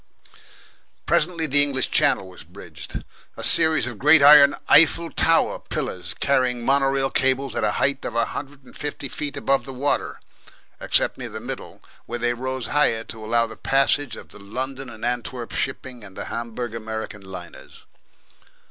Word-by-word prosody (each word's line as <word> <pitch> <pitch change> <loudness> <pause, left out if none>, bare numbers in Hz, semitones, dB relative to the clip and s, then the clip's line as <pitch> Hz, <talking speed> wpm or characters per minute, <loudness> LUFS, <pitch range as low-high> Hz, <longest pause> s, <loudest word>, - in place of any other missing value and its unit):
Presently 165 0 0
the 145 -1 +6
English 140 -2 +1
Channel 95 - +2
was 90 -1 -13
bridged 80 -4 -10 0.3
a - - -6
series 160 -6 +5
of 120 -3 -6
great 150 +1 +6
iron 145 -1 +8
Eiffel 165 +2 +5
Tower 165 0 +2
pillars - - -5
carrying 125 -3 0
mono 135 0 +3
rail 135 0 0
cables 135 0 0
at - - -2
a - - +1
height 140 +1 0
of - - -5
a 115 -1 +2
hundred 140 +3 -8
and 125 - -18
fifty 145 -1 -5
feet 145 +2 -5
above 135 0 +1
the 135 - -9
water, 140 +3 -2 0.6
except - - 0
near - - -6
the - - -7
middle, - - -8 0.2
where 120 - -4
they 120 0 0
rose 130 +1 -4
higher 115 -6 +1
to 110 -1 -9
allow 115 +2 +1
the 110 -1 -9
passage 135 0 +1
of - - -12
the - - -14
London 130 +6 -6
and 115 0 -8
Antwerp 120 0 -4
shipping 130 -3 -4
and 95 -2 -13
the - - -5
Hamburg 120 0 -5
America 110 -2 -6
liners. 95 -3 -12
130 Hz, 170 wpm, -22 LUFS, 115-140 Hz, 0.6 s, iron